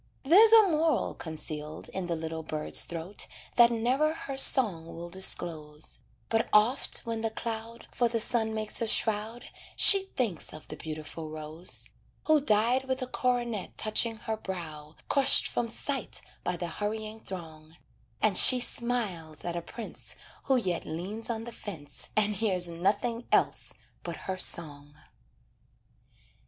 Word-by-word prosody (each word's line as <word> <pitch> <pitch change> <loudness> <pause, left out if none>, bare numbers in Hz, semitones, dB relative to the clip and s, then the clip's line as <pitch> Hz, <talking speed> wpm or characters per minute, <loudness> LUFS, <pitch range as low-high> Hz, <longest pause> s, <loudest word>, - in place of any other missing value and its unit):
There's 395 +11 +6
a 450 -1 +8
moral 320 - 0
concealed 155 -1 -6
in 190 -2 -5
the 170 - -2
little 160 0 -5
bird's 155 -1 +2
throat 170 +4 -4 0.3
That 235 -1 +6
never 260 +7 0
her 275 -4 -5
song 205 - +4
will 170 +1 -8
disclose; 160 -5 +2 0.3
But 225 0 -1
oft 225 +7 +2
when 230 -1 -4
the 225 - -1
cloud 225 +1 -7
For 240 - +1
the 230 0 -1
sun 220 -1 +2
makes 215 +1 -2
a 230 - -1
shroud 220 +2 -1 0.3
She 390 -1 +7
thinks 220 -10 -3
of 155 - -13
the - - -7
beautiful 155 0 -8
rose, 155 +3 -2 0.3
Who 310 -2 +3
died 240 +1 +2
with 260 0 -3
a - - -3
coronet 245 -5 -3
touching 225 +1 +1
her 220 0 -5
brow, 160 -6 -8
Crushed 275 -1 +5
from 235 -1 -3
sight 270 +1 -4 0.2
by 180 - -3
the 175 - -4
hurrying 215 +4 -5
throng, 160 -5 -11 0.5
And 215 -3 +2
she 255 +6 +9
smiles 210 -12 -3
at 175 -1 -3
a 170 - -3
prince, 225 +6 -8 0.3
Who 270 - +2
yet 185 -9 -1
leans 190 +9 -6
on 225 -1 -3
the 235 - -8
fence 170 -10 -7
And 210 0 +4
hears 185 -4 0
nothing 205 +8 -2
else - - +1 0.3
but - - -6
her 190 -1 -4
song. 145 -5 +2
215 Hz, 150 wpm, -28 LUFS, 165-235 Hz, 0.5 s, she